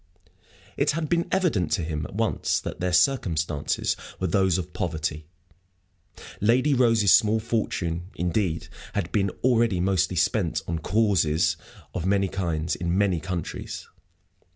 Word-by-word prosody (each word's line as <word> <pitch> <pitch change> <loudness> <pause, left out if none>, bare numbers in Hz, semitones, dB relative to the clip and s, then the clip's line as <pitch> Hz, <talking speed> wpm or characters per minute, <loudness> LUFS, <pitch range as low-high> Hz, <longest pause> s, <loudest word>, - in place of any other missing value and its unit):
It 140 - +2
had 155 -1 -2
been 170 0 +1
evident 150 - +1
to 90 - +1
him 80 -1 -3
at - - -12
once - - 0
that - - -6
their 90 +1 -1
circumstances 85 - +1 0.2
were 95 - -1
those 95 0 +2
of 90 -1 -5
poverty. 80 -4 -3 1.1
Lady 125 +7 +3
Rose's 115 -6 +4
small 110 +1 +5
fortune, 90 -6 -2
indeed, 90 -1 -1 0.3
had 85 - -2
been 100 -2 +1
already 115 -6 +3
mostly 90 -1 +1
spent 80 -2 +1
on 85 -1 -2
"causes" 90 -6 +2 0.4
of 90 +1 -2
many 100 -1 +2
kinds, 85 -4 -2
in 85 +1 -1
many 95 -4 +2
countries. 85 0 -5
90 Hz, 135 wpm, -25 LUFS, 85-110 Hz, 1.1 s, small